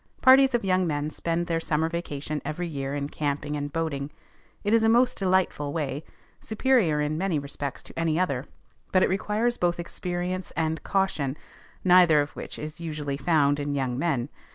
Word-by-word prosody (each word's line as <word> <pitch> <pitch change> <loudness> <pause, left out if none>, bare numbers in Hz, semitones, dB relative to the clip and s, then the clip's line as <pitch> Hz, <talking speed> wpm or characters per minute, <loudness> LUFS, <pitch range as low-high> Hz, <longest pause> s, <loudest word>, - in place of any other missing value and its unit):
Parties 265 0 +6
of 230 - -1
young 185 -1 +2
men 150 -1 -2
spend 170 +2 -1
their 165 -1 0
summer 160 0 0
vacation 155 -3 -4
every 175 +3 -3
year 140 -3 -4
in 140 -1 -2
camping 145 0 -2
and 145 0 -3
boating. 145 -3 -2 0.5
It 205 +1 +1
is 230 - +5
a 225 - +4
most 250 +2 +4
delightful 185 -6 +1
way, 150 -2 -2 0.4
superior 220 - +2
in 150 +1 -1
many 185 -4 0
respects 140 -1 -4
to - - -8
any 165 0 +1
other, 140 -8 -1 0.4
but 185 - +4
it - - +3
requires 210 +5 0
both 175 -1 +1
experience 180 +1 -3
and 160 -1 0
caution, 160 -8 0 0.5
neither 180 -4 +6
of 145 +1 -1
which - - -8
is 155 +2 -7
usually 150 -4 -3
found 145 -2 +2
in 145 0 -2
young 130 -3 -1
men. 140 -6 0
160 Hz, 175 wpm, -26 LUFS, 145-185 Hz, 0.5 s, Parties